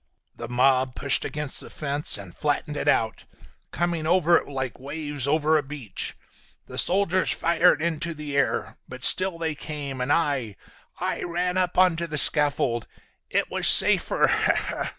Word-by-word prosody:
"The 115 - -7
mob 130 +1 +1
pushed 140 -1 0
against 150 -2 -3
the - - -8
fence 145 -3 -1
and 100 -4 -12
flattened 150 0 -2
it - - -4
out, 110 -1 0 0.4
coming 170 -2 -2
over 175 -1 +3
it - - -5
like 130 -4 -5
waves 145 0 -4
over 155 +1 +2
a - - -1
beach. 135 -7 -5 0.5
The - - -2
soldiers 185 0 +1
fired 170 -1 +2
into 170 0 -2
the 150 -2 -6
air, 140 - -1
but 130 0 -9
still 185 -2 +4
they 165 -1 -2
came, 145 -3 -6
and 125 +3 -1
I, 140 -10 0 0.4
I - - -3
ran—up, 180 +1 -2
onto 170 -2 +2
the 150 -1 -4
scaffold. 140 -6 +1 0.4
It - - -1
was - - +4
safer!" - - +5
150 Hz, 150 wpm, -24 LUFS, 135-170 Hz, 0.5 s, safer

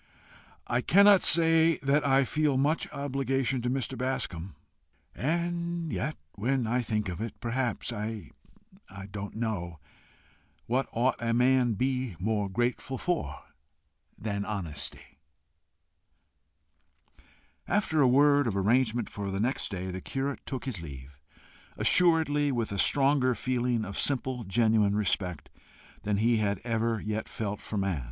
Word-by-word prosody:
"I 120 +1 0
cannot 200 +5 +6
say 165 -1 +5
that 140 +2 +2
I 135 -1 +3
feel 150 -1 +1
much 145 +4 0
obligation 135 -2 -1
to 120 - -1
Mr. 130 0 -2
Bascombe. 100 - -3 0.6
And 170 - -2
yet 150 +4 -2
when 125 +4 -1
I 120 +3 +1
think 105 -3 -2
of 90 +2 -5
it, 115 -1 -6
perhaps 120 0 -2
I 110 -1 -5 0.8
don't 100 0 -6
know 100 -8 -3 0.9
what 130 +3 0
ought 125 +3 +1
a 115 0 0
man 125 +1 +4
to 115 - -1
be 130 -2 -1
more 105 +1 -1
grateful 120 +5 -2
for 175 +5 -2 0.7
than 100 -2 -3
honesty?" 90 -9 -6 2.5
After 175 -7 +1
a 135 - +6
word 145 +1 +4
of 100 -4 -1
arrangement 115 +3 +2
for 100 -1 -6
next 125 +6 -1
day 95 -2 -4
the 95 +1 -6
curate 135 +1 -3
took 130 -1 -4
his 115 -10 -4
leave, 70 -3 -10 0.6
assuredly 160 -5 +3
with 115 -5 -2
a 100 - -3
stronger 135 -1 +3
feeling 125 -3 -1
of 100 - -5
simple 130 -3 -1
genuine 110 0 +2
respect 90 -6 -1 0.5
than 105 -1 -1
he 115 +2 +3
had 100 -2 0
ever 115 -1 0
yet 110 +1 -4
felt 105 -2 -4
for 105 - -5
man. 95 -5 0
120 Hz, 135 wpm, -28 LUFS, 105-135 Hz, 2.5 s, cannot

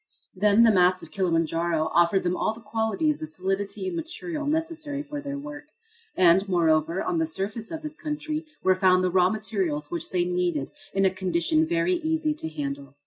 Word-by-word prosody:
Then, 205 +3 +4
the 230 - +6
mass 185 -1 +3
of - - -11
Kilimanjaro 165 -3 0
offered 175 +3 +3
them 180 0 0
all 220 - 0
the - - -11
qualities 225 +7 -1
of 155 - -3
solidity 195 - -3
and 365 - -3
material 330 -2 -4
necessary 310 -2 -2
for 290 0 -6
their 280 -1 -5
work. 290 +1 -8 0.5
And, 185 +2 +5
moreover, 165 0 +2
on 350 -3 -1
the 325 - +1
surface 215 -5 -4
of 320 -1 -6
this 305 0 -5
country 305 0 -4 0.2
were 190 - +5
found 185 0 +3
the 185 - +1
raw 180 0 +4
materials 190 -9 -2
which 170 -2 -4
they 180 -1 +1
needed 175 -5 -1 0.2
in 195 0 +2
a 190 - +4
condition 185 - +1
very 345 +2 +1
easy 320 -1 0
to 300 - -6
handle. 140 -2 -5
195 Hz, 190 wpm, -26 LUFS, -, 0.5 s, the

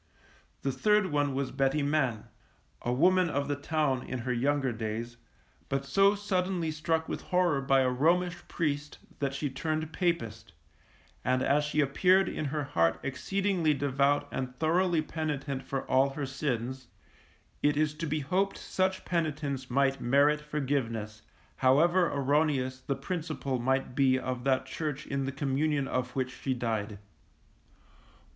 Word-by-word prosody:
The 135 - +1
third 200 +7 +2
one 145 -2 +1
was 135 -1 -2
Betty 135 +2 +1
Man, 135 -7 0 0.6
a 120 - -1
woman 180 +7 +4
of 140 -1 -1
the 145 - 0
town 145 -2 0
in 130 - -5
her 125 +1 -2
younger 135 +2 +1
days, 115 +1 -4 0.5
but 135 0 -1
so 195 +8 +4
suddenly 185 -4 -1
struck 160 +1 -1
with - - -4
horror 180 -6 +1
by 135 0 +3
a 130 - +2
Romish 170 +6 +2
priest 150 -3 -2 0.2
that 140 -1 -1
she 145 +2 -1
turned 155 +4 -3
Papist; 115 - -2 0.7
and 130 +1 +1
as 145 +1 +3
she 150 +1 +1
appeared 180 +7 +3
in 155 - -3
her 150 +1 -2
heart 85 -11 +1
exceedingly 175 +3 0
devout 140 +1 +1
and 125 -1 -4
thoroughly 170 +2 +2
penitent 145 -4 -3
for 135 -1 -3
all 135 +1 +4
her 140 +1 -4
sins, 130 -2 -3 0.7
it 145 0 +2
is 155 0 +2
to 165 +2 -4
be 155 +1 -1
hoped 185 +7 0
such 185 0 -1
penitence 145 -6 -2
might 135 +1 +1
merit 145 +4 +3
forgiveness, 130 -8 -2 0.4
however 170 +7 +4
erroneous 140 -2 +1
the 140 - -2
principle 155 -8 -3
might 130 +1 0
be 130 -1 +3
of 130 -1 -4
that 130 -1 +2
Church 150 +2 -4
in 140 -1 -2
the 135 - -2
communion 140 +1 0
of 125 -1 -2
which 130 -1 -2
she 130 -2 0
died. 110 -4 -2
140 Hz, 150 wpm, -29 LUFS, 130-155 Hz, 0.7 s, woman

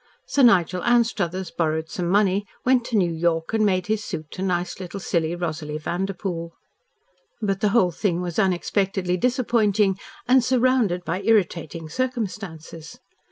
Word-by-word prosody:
Sir 285 - +1
Nigel 180 -7 +4
Anstruthers 200 -7 +1
borrowed 160 -1 -1
some 175 -2 -2
money, 200 +1 +2 0.2
went 255 -1 +4
to 230 - 0
New 175 -4 +2
York 165 +2 0
and 220 -1 +2
made 185 -3 +2
his 215 +1 -1
suit 155 -6 -6
to 185 - -7
nice 180 -1 -1
little 185 +1 -6
silly 170 -2 -1
Rosalie 155 -3 -4
Vanderpoel. 175 0 -4 0.9
But 195 -3 -1
the 210 - +3
whole 195 -4 +3
thing 175 0 -1
was 175 0 -3
unexpectedly 190 -1 0
disappointing 215 -4 +1 0.3
and 255 0 +5
surrounded 245 -7 +2
by 175 +4 -2
irritating 175 -6 0
circumstances. 185 - -5
185 Hz, 145 wpm, -23 LUFS, 170-215 Hz, 0.9 s, and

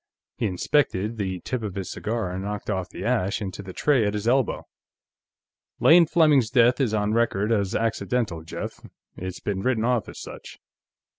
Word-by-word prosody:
He 115 - -1
inspected 105 +1 0
the 95 -3 -2
tip 130 +6 -3
of 105 -4 -5
his 95 -2 -4
cigar 110 -4 -3
and 95 +1 -4
knocked 105 +1 -4
off 95 -2 -2
the - - -7
ash 110 -4 +1
into 100 -2 -5
the 95 -2 -8
tray 135 +4 +2
at 105 0 0
his 105 +2 -3
elbow. 130 0 +1 1.1
"Lane 170 0 +7
Fleming's 150 -8 +4
death 125 +2 +4
is 125 -5 +1
on 105 0 0
record 110 -2 +1
as 100 -4 +1
accidental, 115 -5 -1
Jeff. 80 - -6 0.4
It's 95 0 -6
been 100 -2 -3
written 115 -1 +1
off 120 -3 0
as - - -9
such. - - -10
110 Hz, 175 wpm, -25 LUFS, 95-125 Hz, 1.1 s, Lane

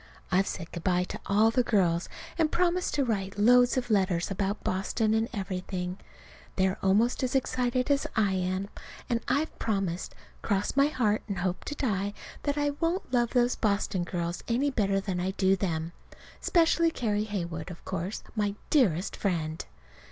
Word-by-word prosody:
I've 190 +1 +3
said 165 -2 -5
good 170 - -6
bye 180 -1 +2
to - - -6
all 215 +3 +4
the 250 - +3
girls, 180 -7 +1 0.3
and 320 -2 +1
promised 360 0 +1
to 285 - +2
write 200 -4 -2
loads 245 +4 +5
of 245 -2 -1
letters 185 -3 +1
about 200 +1 -2
Boston 215 +4 0
and 220 +2 +1
everything. 185 -3 -4 0.6
They 190 - +3
are 190 - -2
almost 210 +6 +3
as 255 0 -1
excited 255 0 +1
as 280 0 +2
I 210 -3 +3
am; 185 +1 -1 0.4
and 235 -1 +1
I've 285 +6 0
promised, 195 -5 -2 0.3
"cross 200 +2 0
my 275 +1 +5
heart 225 -8 +1
and 200 -3 -3
hope 180 +1 -2
to 290 - -4
die," 205 -6 -1 0.3
that 285 0 -1
I 290 0 +1
won't 335 -3 -1
love 240 -2 +3
those 245 0 +2
Boston 200 -4 0
girls 175 -1 -3
better 230 -6 +1
than 190 -2 -3
I 185 +2 -1
do 190 0 +4
them 165 -4 -2 0.5
specially 335 -1 +3
Carrie 215 -8 -1
Heywood, 170 -6 -4
of 175 - -10
course, 190 +2 -4
my 205 -2 0 0.2
dearest 195 - +2
friend. 160 -5 -2
205 Hz, 170 wpm, -28 LUFS, 185-245 Hz, 0.6 s, loads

